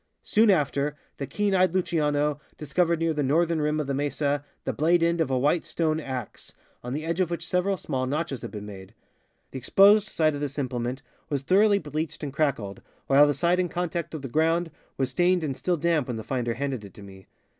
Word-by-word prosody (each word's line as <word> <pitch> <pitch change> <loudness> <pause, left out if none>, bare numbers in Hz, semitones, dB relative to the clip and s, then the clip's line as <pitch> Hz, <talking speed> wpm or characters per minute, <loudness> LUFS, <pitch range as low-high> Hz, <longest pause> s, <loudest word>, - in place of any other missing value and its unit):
Soon 220 +1 +3
after 145 -4 +1 0.2
the 140 - -4
keen 205 -1 0
e3^ed 185 -2 +3
Luciano 150 -5 0 0.2
discovered 170 +3 +1
near 165 0 0
the 150 - -1
northern 160 +4 +2
rim 150 +1 0
of 150 - -1
the 140 - -2
mesa 145 0 -1 0.2
the - - -2
blade 165 +3 +2
end 170 0 +2
of 160 - 0
a 130 - +1
white 150 +6 +2
stone 160 -2 -1
ax, 130 -6 -7 0.3
on 125 +1 -4
the 155 +3 -3
edge 170 +2 -2
of 180 - +1
which 170 0 -4
several 185 +2 +1
small 130 -5 -3
notches 145 -2 -2
had - - -6
been 105 -1 -7
made. 100 0 -11 0.6
The 135 - -5
exposed 200 - +5
side 155 -4 +1
of 145 - -5
this 145 -1 -4
implement 125 -1 -3 0.3
was 140 -2 -2
thoroughly 200 +6 +4
bleached 155 -2 -4
and 140 -2 -4
crackled, 135 - -1 0.2
while 140 +2 +6
the 145 - +1
side 175 +1 +2
in 180 -1 0
contact 170 -1 -3
with 150 - -7
the - - -3
ground 165 +5 +1 0.3
was 135 -1 0
stained 180 -1 +2
and 140 -4 -2
still 180 +4 -1
damp 160 -3 +1
when 120 -3 -3
the 110 - -6
finder 120 -1 -2
handed 135 -3 -3
it 100 - -12
to 105 - -12
me. 95 -1 -13
150 Hz, 220 wpm, -26 LUFS, 135-170 Hz, 0.6 s, while